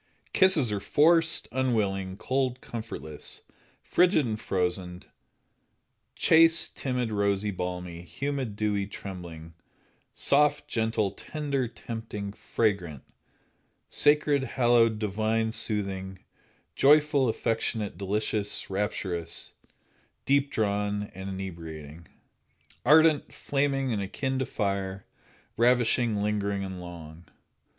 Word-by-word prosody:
Kisses 165 - +4
are 105 - -1
forced, 165 - +3
unwilling, 100 -7 0
cold, 130 +2 -1
comfortless, 110 -12 -6 0.4
frigid 175 -5 +3
and 110 -2 -3
frozen, 90 -2 -2 1.1
chaste, 165 +1 +4
timid, 125 -4 -2
rosy, 100 0 +1
balmy, 90 -2 -5
humid, 135 +4 -4
dewy, 105 -2 0
trembling, 85 -5 -8 0.6
soft, 145 +1 +2
gentle, 110 -3 0
tender, 140 +3 -3
tempting, 110 -3 -6
fragrant, 95 - -1 0.9
sacred, 145 -1 +4
hallowed, 120 -3 +3
divine, 110 +2 0
soothing, 95 -4 -2 0.6
joyful, 145 -2 +4
affectionate, 110 -2 -1
delicious, 105 +1 -2
rapturous, 95 -4 -2 0.7
deep 140 +1 +3
drawn 105 -1 -1
and 95 +1 -7
inebriating, 85 -4 -7 0.8
ardent, 155 +2 +5
flaming 135 -2 -1
and 105 - -1
akin 130 +7 -2
to 130 - -1
fire, 100 -3 -2 0.5
ravishing, 120 -3 +3
lingering 100 -1 -1
and 95 -1 -6
long. 85 -1 -10
105 Hz, 95 wpm, -28 LUFS, 95-130 Hz, 1.1 s, ardent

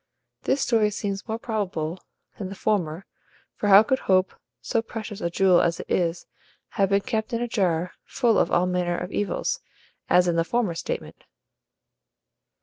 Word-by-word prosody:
This 270 +1 +1
story 225 -3 +3
seems 200 0 -4
more 220 0 -2
probable 190 -8 -3 0.4
than 190 -3 -4
the 195 - -7
former; 185 -4 -1 0.5
for 210 - -3
how 200 +2 +9
could 260 +4 +1
HOPE, 185 0 +2 0.3
so 230 - 0
precious 220 -2 -7
a 170 - 0
jewel 185 0 +4
as 170 -1 0
it - - -8
is, 170 -1 0 0.4
have 195 -3 +1
been 200 0 +3
kept 220 +2 -3
in 230 - 0
a - - -2
jar 180 -6 0
full 235 -4 +2
of - - +2
all 175 - +3
manner 180 -1 0
of 180 +2 -5
evils, 205 - -1 0.5
as 180 0 +5
in 170 -1 +1
the 165 - +3
former 220 0 0
statement? 165 - -5
195 Hz, 170 wpm, -25 LUFS, 175-220 Hz, 0.5 s, how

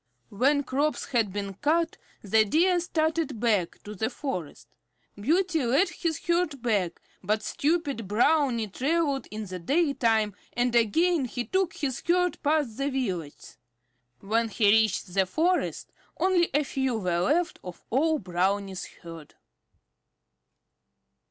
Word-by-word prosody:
When 280 +7 +2
crops 285 +4 -1
had 230 -6 +1
been 200 0 -4
cut, 315 - 0 0.3
the 220 +2 +4
Deer 350 - +3
started 315 -6 -1
back 210 -7 0
to 210 - -8
the 220 +3 -2
forest. 180 - -6 0.5
Beauty 325 - +1
led 270 +11 +3
all - - -11
his 325 -3 -2
herd 340 -4 0
back, 205 -7 0 0.2
but 215 +3 -1
stupid 285 - -1
Brownie 240 +1 +2
traveled 280 - 0
in 215 0 -5
the 185 -1 -6
daytime, 230 - +1 0.2
and 245 0 0
again 275 - +3
he 245 0 -4
took 380 -2 0
his 265 -4 -3
herd 360 +1 +1
past 290 -6 0
the 275 +1 0
villages. 185 - -4 0.6
When 225 +3 0
he 205 -1 +3
reached 215 -4 +2
the 190 -1 +2
forest 345 - 0 0.3
only 365 -2 +2
a 295 +2 +2
few 265 -3 -1
were 180 -4 0
left 330 - +1
of 180 -2 -9
all 310 +6 +2
Brownie's 190 0 -1 0.2
herd. 165 -3 -11
250 Hz, 135 wpm, -27 LUFS, 205-315 Hz, 0.6 s, the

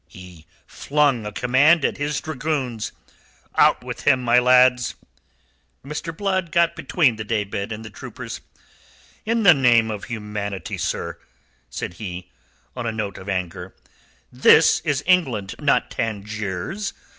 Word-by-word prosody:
He 90 -3 -14 0.2
flung 140 -7 0
a - - -5
command 135 +8 +3
at - - -1
his 145 0 -2
dragoons. 130 -7 -3 0.6
"Out - - +4
with - - -6
him, 130 -1 +3
my 120 0 +5
lads." 125 0 +4 0.9
Mr. 150 +3 -5
Blood 190 -4 -1
got 170 0 +2
between 140 -11 +1
the 110 - -4
day 105 -1 -1
bed 100 +1 -5
and 110 +1 -6
the 110 - -9
troopers. - - -8 0.9
"In 230 0 +1
the 180 -4 +8
name 120 -5 +3
of 105 -2 -6
humanity, 105 -4 -5
sir!" - - -3 0.5
said 75 - -5
he, 90 -3 -7 0.4
on 120 -2 -4
a - - 0
note 105 -4 -4
of 95 +2 -9
anger. 90 -1 -4 0.6
"This - - +5
is 145 -3 -1
England, 130 - +1
not - - +1
Tangiers. 110 - -4
120 Hz, 140 wpm, -22 LUFS, 105-150 Hz, 0.9 s, the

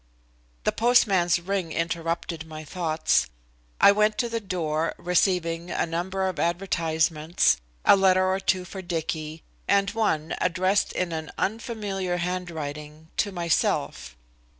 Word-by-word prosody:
The - - +2
postman's 200 -8 +3
ring 180 -1 -2
interrupted 165 -1 -3
my 155 0 -8
thoughts. 160 0 0 0.5
I - - +8
went 210 +1 +2
to 240 - 0
the 230 0 -2
door, 165 -5 -2
receiving 175 -1 0
a - - 0
number 185 +3 -2
of 185 - -4
advertisements, 165 -2 +1 0.3
a - - +8
letter 185 -1 +4
or 190 +1 +1
two 190 -1 0
for 190 +1 -7
Dicky, 160 -2 -4 0.2
and 200 0 +3
one, 190 -8 0
addressed 185 +3 +1
in 180 -2 -1
an 160 -1 -4
unfamiliar 200 -4 -2
handwriting, 160 -4 -5
to 205 - +1
myself. 170 - -1
175 Hz, 125 wpm, -25 LUFS, 160-195 Hz, 0.5 s, I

